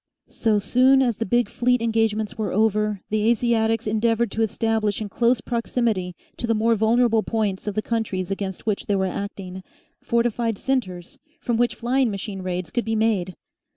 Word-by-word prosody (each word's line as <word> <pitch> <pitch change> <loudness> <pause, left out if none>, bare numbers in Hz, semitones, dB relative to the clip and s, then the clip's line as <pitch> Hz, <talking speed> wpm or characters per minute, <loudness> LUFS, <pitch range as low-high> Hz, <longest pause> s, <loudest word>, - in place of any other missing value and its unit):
So 220 -3 +1
soon 260 +6 +4
as 240 -4 0
the 225 - -3
big 240 +3 +2
fleet 250 +1 +1
engagements 225 -2 0
were 215 -2 -2
over, 210 -1 +1
the 215 +1 +2
Asiatics 225 -1 +1
endeavoured 225 +1 +1
to 225 - -2
establish 220 -1 0
in 215 -2 -4
close 235 +3 +2
proximity 230 -7 -1 0.2
to 235 - -3
the 230 - +2
more 225 +2 +2
vulnerable 225 +1 +3
points 215 -3 -2
of 210 - -2
the 215 - -1
countries 200 -5 -2
against 195 -1 -4
which 210 -2 -2
they 205 - +1
were 190 -1 +1
acting, 190 -1 -5 0.4
fortified 235 -1 0
centres 190 -11 -3 0.2
from 240 - -1
which 240 +1 +1
flying 250 +1 +1
machine 195 -1 -5
raids 180 -1 -4
could 240 -2 -1
be 225 0 -1
made. 205 -5 0
220 Hz, 175 wpm, -23 LUFS, 200-235 Hz, 0.4 s, soon